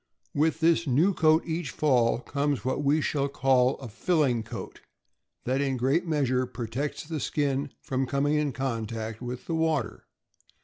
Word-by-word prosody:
With 160 +2 +1
this 165 0 +3
new 155 +10 +3
coat 160 -1 +4
each 165 -3 -3
fall 125 -6 +2
comes 140 -5 -1
what 130 +2 -1
we 145 +3 +3
shall 140 -1 0
call 130 -1 +3
a 135 - -8
filling 125 - +1
coat, 110 - -8 0.6
that 130 +2 +1
in 135 -2 0
a - - -3
great 135 +8 +1
measure 130 -5 +1
protects 125 +4 -4
the 160 0 -4
skin 140 -1 -1
from 130 0 -1
coming 140 +2 +1
in 150 -2 +1
contact 115 -4 -4
with 125 0 -6
the 165 - -3
water. 160 -7 -1
140 Hz, 165 wpm, -27 LUFS, 125-155 Hz, 0.6 s, coat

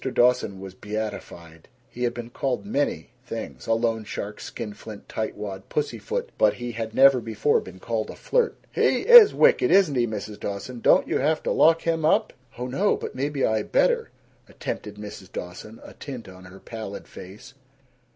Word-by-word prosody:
Dawson 120 -6 +2
was 95 -1 -8
beatified. 100 -6 -7 0.2
He 125 +1 -4
had 120 - -1
been 120 0 -7
called 130 +6 -2
many 145 - -2
things 65 -3 -7
loan 115 0 +1
shark, 105 0 -6
skinflint, 105 -2 -8
tightwad, 105 -3 -5
pussyfoot 120 -7 -3
but 105 -1 +4
he 120 0 -5
had 110 -1 -5
never 135 -2 +6
before 115 +6 +1
been 95 0 -11
called 110 +1 -3
a - - -7
flirt. 485 -2 0
"He - - +2
is 475 -3 +9
wicked, 475 -6 +4
isn't 190 -7 +5
he, 120 -2 +1
Mrs. 105 -1 -6
Dawson? 100 +5 -5
Don't - - +4
you - - 0
have 155 +3 +1
to - - -1
lock 165 +1 +4
him 165 -1 0
up?" 210 +8 +2 0.2
"Oh 125 - -4
no, 160 +12 +1
but - - -6
maybe 140 +1 -1
I 110 -1 +1
better," - - +1 0.4
attempted 105 -1 -6
Mrs. 105 -2 -10
Dawson, 95 +5 -8
a - - -12
tint 130 -7 -8
on 95 0 -13
her 95 +1 -13
pallid 110 -3 -8
face. 95 +4 -12
115 Hz, 170 wpm, -25 LUFS, 105-135 Hz, 0.4 s, is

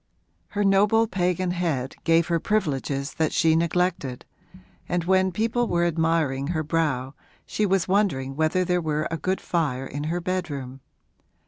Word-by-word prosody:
Her 205 - +2
noble 205 +3 +4
pagan 180 -3 0
head 160 -8 -2
gave 165 0 +4
her 170 0 0
privileges 145 -8 -1
that 160 -1 0
she 160 -1 +3
neglected, 170 -6 0 0.6
and 175 -1 0
when 190 +1 +2
people 230 +5 0
were 175 -2 +1
admiring 160 -5 0
her 160 -1 -1
brow 150 -4 -1 0.3
she 210 - 0
was 190 -2 +1
wondering 155 -10 +1
whether 160 +4 +1
there 180 0 +1
were 155 -1 -1
a 165 - -1
good 185 +4 -1
fire 140 -7 -1
in 145 +2 -5
her 170 +3 -1
bedroom. 150 -8 -4
170 Hz, 150 wpm, -25 LUFS, 150-185 Hz, 0.6 s, noble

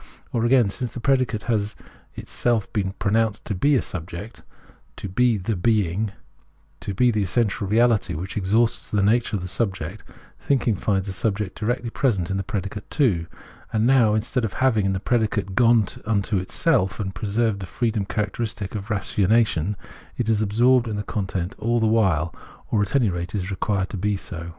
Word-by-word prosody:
Or 115 -1 +1
again, 120 -4 +4
since 125 +2 -5
the - - -4
predicate 130 -3 +1
has 105 -3 -1 0.4
itself 115 -4 -1
been 95 -3 -1
pronounced 110 +1 0
to 105 - -2
be 140 +10 +3
a 125 - +2
subject, 90 +5 -7 0.5
to - - -6
be 115 +4 +2
the 100 +3 -2
being, 100 0 +1 0.7
to 100 - -5
be 125 +4 +4
the 110 -2 0
essential 100 +1 0
reality, 110 -4 +2
which 90 +5 -5
exhausts 110 +4 +1
the 105 -2 +1
nature 110 +2 +2
of 95 - -3
the - - -4
sub 100 +1 -1
ject, 90 +5 -7 0.4
thinking 125 -5 +1
finds 95 0 0
the 95 - -4
subject 105 -4 -2
directly 120 +1 -1
present 100 - 0
in 95 - 0
the 95 - -2
predicate 100 +1 -5
too: 100 - +1 0.4
and 110 0 +1
now, 120 -4 +4
instead 115 +3 -1
of 110 - -2
having, 110 -7 +2
in 95 - +1
the 95 - -1
predicate, 105 -3 0
gone 115 +1 +4 0.2
into 100 -2 +1
itself, 95 - +1
and 95 -2 -3
preserved 105 +2 0
the 95 - -6
freedom 110 -2 -1
characteristic 105 0 -3
of 105 -2 -5
ratiocination, 105 -2 +1 0.4
it 115 -2 -1
is 110 -1 +2
absorbed 120 +4 +3
in 110 - -3
the 105 - -3
content 95 -3 -3
all 120 +1 +1
the 110 - +2
while, 95 -8 +2 0.4
or, 105 - +2
at 100 +6 -1
any 120 -8 +3
rate, 85 +3 -4
is 95 -1 -2
required 95 0 -1
to 105 - -4
be 100 +2 0
so. 85 -2 -7
105 Hz, 185 wpm, -23 LUFS, 95-115 Hz, 0.7 s, again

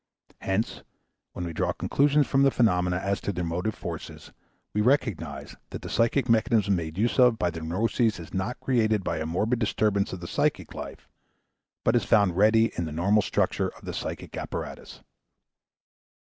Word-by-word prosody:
Hence, 95 +4 -2 0.5
when 90 - -4
we 85 - -5
draw - - 0
conclusions 145 +1 +2
from 135 +1 +2
the 140 - +6
phenomena 90 -8 +2
as 100 +1 -2
to - - -2
their 90 -2 -3
motive 90 +6 -2
forces, - - -8 0.4
we 105 - +1
recognize 125 - 0
that - - -7
the - - -6
psychic 120 +3 +2
mechanism 110 -3 +3
made 80 -1 -4
use 115 +5 +1
of 125 -3 +6
by 90 -4 0
the 80 0 -7
neuroses 105 +6 0
is 85 - -10
not 95 +6 -2
created 110 -5 +1
by 80 - -2
a 80 - -3
morbid 110 +9 0
disturbance 105 -2 +1
of 95 - -5
the 85 - -7
psychic - - -1
life, - - -8 0.8
but 115 - +3
is 120 - +3
found 100 -5 +3
ready 110 +3 +4
in 85 - -2
the 80 - -5
normal 100 +7 +2
structure - - 0
of - - -15
the - - -5
psychic - - -5
apparatus. - - -6
105 Hz, 175 wpm, -26 LUFS, 90-115 Hz, 0.8 s, the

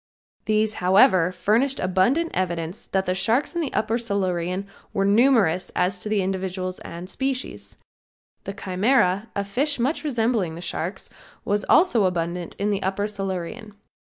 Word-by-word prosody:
These, 215 0 +2
however, 185 -1 +5
furnished 225 +9 +1
abundant 240 - +1
evidence 170 0 -3
that 190 0 0
the 185 - 0
sharks 220 - +1
in 345 - -1
the 295 - -3
upper 225 +2 0
Silurian 190 -4 -1 0.3
were 195 - +1
numerous 205 -5 +3
as 185 +1 +1
to 210 - -5
individuals 185 -1 -2
and 170 +2 -8
species. 265 +6 -4 0.7
The 195 - -4
Chimera, 200 +1 +1
a 200 - 0
fish 270 +9 -1
much 265 +8 -1
resembling 225 - 0
the - - -8
sharks, 175 +2 -4 0.3
was 205 +1 0
also 295 - +4
abundant 175 -1 -2
in 205 +1 -1
the 200 -1 -1
upper 195 +2 -1
Silurian. 200 +1 -5
195 Hz, 145 wpm, -24 LUFS, 185-230 Hz, 0.7 s, however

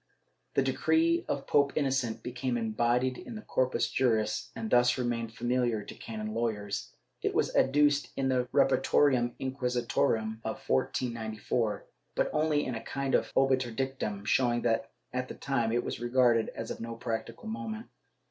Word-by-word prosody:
The - - +4
decree 335 +1 +2
of 140 -1 -2
Pope 140 -1 +3
Innocent 130 -6 0
became 125 0 -2
embodied 120 +3 +1
in 235 - -8
the 215 - -7
Corpus 130 -7 +1
Juris 125 0 +1
and 115 -1 -4
thus 120 0 +5
remained 120 -2 -1
famihar 120 -2 0
to - - -7
canon 110 -1 -6
lawyers; 110 -3 -2 0.3
it - - -1
was - - +1
adduced 145 +1 +3
in 135 -1 +1
the 125 -1 +1
Repertorium 125 -4 +3
Inquisitorum 120 -4 0
of - - -5
1494, 110 - -1 0.3
but - - +1
only 150 -1 +2
in 130 - -2
a 115 - -4
kind 140 -1 -3
of - - +2
obiter 130 -2 +3
dictum, 115 -5 -3
showing 120 -1 +2
that 115 - +1 0.2
at 125 0 -1
that - - -9
time 120 -4 0
it 120 +1 +1
was - - -4
regarded 120 -2 +3
as 115 - -5
of - - -5
no 115 0 -5
practical 115 - -4
moment. 220 +1 -4
125 Hz, 155 wpm, -30 LUFS, 115-135 Hz, 0.3 s, thus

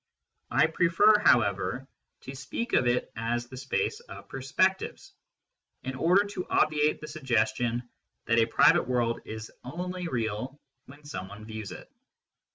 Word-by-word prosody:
I - - +4
prefer, 170 +6 +4
however, 120 - +2 0.3
to 130 - -8
speak 145 - -5
of 125 - +4
it 120 +1 0
as 120 +2 -2
the 130 - -9
space 425 - -1
of 475 - -12
perspectives, 185 +9 -1 0.7
in 130 - -4
order 175 +9 +3
to 195 -3 -5
obviate 150 0 +2
the 150 - -7
suggestion 120 -3 0 0.4
that 115 -1 +3
a 115 - +4
private 115 - +4
world 120 -2 0
is 110 0 -7
only 180 +6 -5
real 120 +1 -3 0.3
when 145 +2 -15
someone 105 -5 -7
views 110 -2 -7
it. - - -10
130 Hz, 140 wpm, -28 LUFS, 115-165 Hz, 0.7 s, I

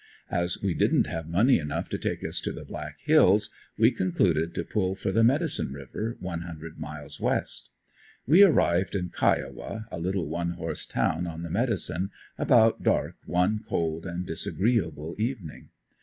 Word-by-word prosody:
As 90 0 0
we 95 -3 +1
didn't - - +3
have 80 +1 -5
money 110 +9 +4
enough 75 -2 -3
to - - -2
take - - -2
us - - -1
to - - -2
the - - -8
Black 75 0 -7
hills, 105 - +5 0.3
we 115 +3 +5
concluded 85 -6 +1
to - - -1
pull 95 -3 -1
for 95 0 -2
the 115 +3 +3
Medicine 140 - +1
river, 70 - -5
one 85 -2 -4
hundred 80 -2 -8
miles - - -7
west. - - -1 0.6
We 165 - +6
arrived 95 - +4
in 90 -2 -1
Kiowa, 110 +5 -1
a - - -5
little 90 0 -1
one 85 +2 -2
horse 80 -2 -4
town 85 +2 0
on 85 0 -6
the 85 - -5
Medicine, 100 -5 0 0.3
about 115 -2 +4
dark - - +1
one 90 +5 +2
cold 80 +1 -2
and 90 +1 -4
disagreeable 85 -3 -1
evening. 110 - -4
90 Hz, 165 wpm, -27 LUFS, 80-110 Hz, 0.6 s, We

